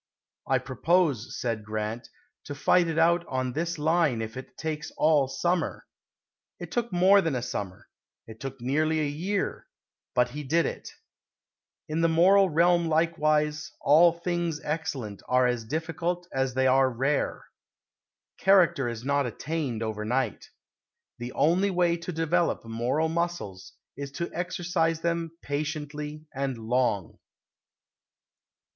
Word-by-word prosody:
"I 135 Hz, -, +3 dB
propose," 135 Hz, -, 0 dB
said 115 Hz, -3 st, -2 dB
Grant, 110 Hz, +2 st, -4 dB, 0.4 s
"to 145 Hz, -, -6 dB
fight 175 Hz, +4 st, +3 dB
it 165 Hz, -1 st, -2 dB
out 170 Hz, +1 st, +4 dB
on 130 Hz, -1 st, -2 dB
this 170 Hz, +3 st, -2 dB
line 155 Hz, -5 st, +2 dB
if 110 Hz, +1 st, -7 dB
it 130 Hz, -, -9 dB
takes 155 Hz, -1 st, -4 dB
all 150 Hz, -3 st, +4 dB
summer." 175 Hz, +6 st, -1 dB, 0.7 s
It -, -, -8 dB
took 235 Hz, -2 st, -1 dB
more 190 Hz, +3 st, +5 dB
than 165 Hz, -6 st, -1 dB
a 120 Hz, -, -2 dB
summer; 95 Hz, -6 st, -5 dB, 0.4 s
it 110 Hz, 0 st, -12 dB
took 135 Hz, -1 st, -6 dB
nearly 155 Hz, +6 st, +1 dB
a 155 Hz, -, +1 dB
year 180 Hz, +8 st, -2 dB, 0.5 s
but 125 Hz, 0 st, +3 dB
he 150 Hz, +3 st, -5 dB
did 160 Hz, +5 st, +2 dB
it. -, -, -5 dB, 1.0 s
In 155 Hz, +2 st, -1 dB
the 165 Hz, -, +4 dB
moral 190 Hz, +4 st, +5 dB
realm 170 Hz, +1 st, +3 dB
likewise, 155 Hz, -1 st, +1 dB
"All 160 Hz, +5 st, +6 dB
things 170 Hz, -2 st, -2 dB
excellent 135 Hz, -10 st, -4 dB
are 125 Hz, 0 st, +3 dB
as 120 Hz, -2 st, 0 dB
difficult 165 Hz, +5 st, -3 dB
as 130 Hz, -1 st, -1 dB
they 130 Hz, 0 st, +2 dB
are 130 Hz, 0 st, +4 dB
rare." 135 Hz, +4 st, -1 dB, 0.9 s
Character 170 Hz, -9 st, +4 dB
is 115 Hz, -1 st, -6 dB
not 140 Hz, -1 st, +1 dB
attained 135 Hz, -2 st, -3 dB
over 110 Hz, -1 st, -3 dB
night. 120 Hz, +1 st, -1 dB, 0.7 s
The 120 Hz, +1 st, -5 dB
only 180 Hz, +6 st, +3 dB
way 175 Hz, -2 st, +2 dB
to 170 Hz, +2 st, -6 dB
develop 165 Hz, -3 st, 0 dB
moral 120 Hz, +8 st, 0 dB
muscles 165 Hz, -, -3 dB, 0.2 s
is 140 Hz, 0 st, -6 dB
to 170 Hz, +4 st, -4 dB
exercise 170 Hz, -2 st, -1 dB
them 170 Hz, -1 st, -2 dB
patiently 150 Hz, +1 st, -4 dB
and 135 Hz, -2 st, -2 dB
long. 115 Hz, -5 st, -1 dB
150 Hz, 140 wpm, -27 LUFS, 130-170 Hz, 1.0 s, All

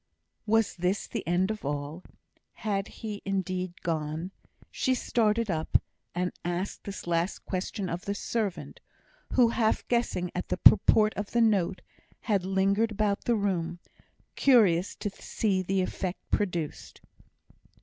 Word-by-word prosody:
Was 225 Hz, -1 st, +2 dB
this 180 Hz, +3 st, 0 dB
the -, -, -4 dB
end 180 Hz, +4 st, +2 dB
of 215 Hz, -, -6 dB
all? 145 Hz, +4 st, -4 dB, 0.5 s
Had 200 Hz, -3 st, -2 dB
he, 210 Hz, -2 st, -7 dB
indeed, 185 Hz, -2 st, -2 dB
gone? 160 Hz, +2 st, -2 dB, 0.4 s
She 260 Hz, -1 st, +1 dB
started 225 Hz, -3 st, +1 dB
up, 160 Hz, -1 st, +2 dB, 0.4 s
and 180 Hz, 0 st, -1 dB
asked 175 Hz, +3 st, -3 dB
this 200 Hz, 0 st, -6 dB
last 170 Hz, +2 st, -1 dB
question 190 Hz, +1 st, -3 dB
of 175 Hz, +1 st, -4 dB
the 200 Hz, -, -1 dB
servant, 210 Hz, -3 st, -3 dB, 0.5 s
who, 245 Hz, -3 st, +5 dB
half 225 Hz, -1 st, +1 dB
guessing 235 Hz, -7 st, 0 dB
at -, -, -3 dB
the -, -, -1 dB
purport 215 Hz, 0 st, +6 dB
of 205 Hz, 0 st, -4 dB
the 235 Hz, -, +3 dB
note, 195 Hz, -5 st, +2 dB, 0.4 s
had 200 Hz, -5 st, +1 dB
lingered 195 Hz, +4 st, +2 dB
about 210 Hz, -1 st, 0 dB
the 240 Hz, -, +3 dB
room, 175 Hz, -5 st, -1 dB, 0.6 s
curious 200 Hz, -9 st, +4 dB
to 205 Hz, -, -4 dB
see 195 Hz, -1 st, -1 dB
the 190 Hz, +1 st, 0 dB
effect 185 Hz, 0 st, -4 dB
produced. 175 Hz, -7 st, -2 dB
195 Hz, 140 wpm, -28 LUFS, 175-215 Hz, 0.6 s, purport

